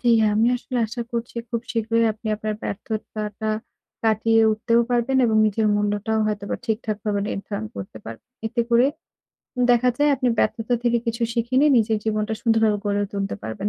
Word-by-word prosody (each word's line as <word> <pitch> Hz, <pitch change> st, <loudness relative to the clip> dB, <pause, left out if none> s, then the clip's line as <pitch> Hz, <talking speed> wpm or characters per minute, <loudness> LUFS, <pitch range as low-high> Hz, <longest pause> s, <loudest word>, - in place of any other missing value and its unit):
জ্বি, 240 Hz, -, +2 dB, 0.2 s
আমি 220 Hz, +2 st, +3 dB
আসলে 250 Hz, 0 st, -4 dB
আশা 235 Hz, +3 st, -6 dB
করছি 235 Hz, 0 st, -4 dB
খুব 235 Hz, -2 st, -1 dB
শীঘ্রই 230 Hz, 0 st, +1 dB
আপনি 220 Hz, +1 st, -12 dB
আপনার 215 Hz, 0 st, -3 dB
ব্যর্থতাটা 215 Hz, 0 st, -5 dB, 0.6 s
কাটিয়ে 225 Hz, 0 st, +3 dB
উঠতেও 230 Hz, +2 st, +2 dB
পারবেন 245 Hz, +2 st, +1 dB
এবং 220 Hz, -2 st, +2 dB
নিজের 215 Hz, +1 st, +1 dB
মূল্যটাও 205 Hz, +1 st, 0 dB
হয়তোবা 205 Hz, -1 st, -2 dB
ঠিকঠাক 220 Hz, -2 st, -2 dB
ভাবে 205 Hz, -2 st, 0 dB
নির্ধারণ 200 Hz, +2 st, -4 dB
করতে 100 Hz, +2 st, -7 dB
পার 115 Hz, 0 st, -7 dB, 0.3 s
এতে 235 Hz, +2 st, -1 dB
করে 235 Hz, +3 st, +5 dB, 0.8 s
দেখা 245 Hz, +1 st, +4 dB
যায় 295 Hz, 0 st, +4 dB
আপনি 255 Hz, -1 st, +1 dB
ব্যর্থতা 225 Hz, +2 st, +1 dB
থেকে 240 Hz, -1 st, +2 dB
কিছু 235 Hz, +1 st, -2 dB
শিখে 235 Hz, +1 st, -1 dB
নিয়ে 295 Hz, -1 st, +5 dB
নিজের 220 Hz, -1 st, +1 dB
জীবনটা 215 Hz, 0 st, -1 dB
সুন্দরভাবে 225 Hz, -2 st, +3 dB
গড়ে 205 Hz, 0 st, +1 dB
তুলতে 200 Hz, 0 st, -2 dB
পারবেন। 205 Hz, +1 st, -3 dB
220 Hz, 165 wpm, -23 LUFS, 210-235 Hz, 0.8 s, করে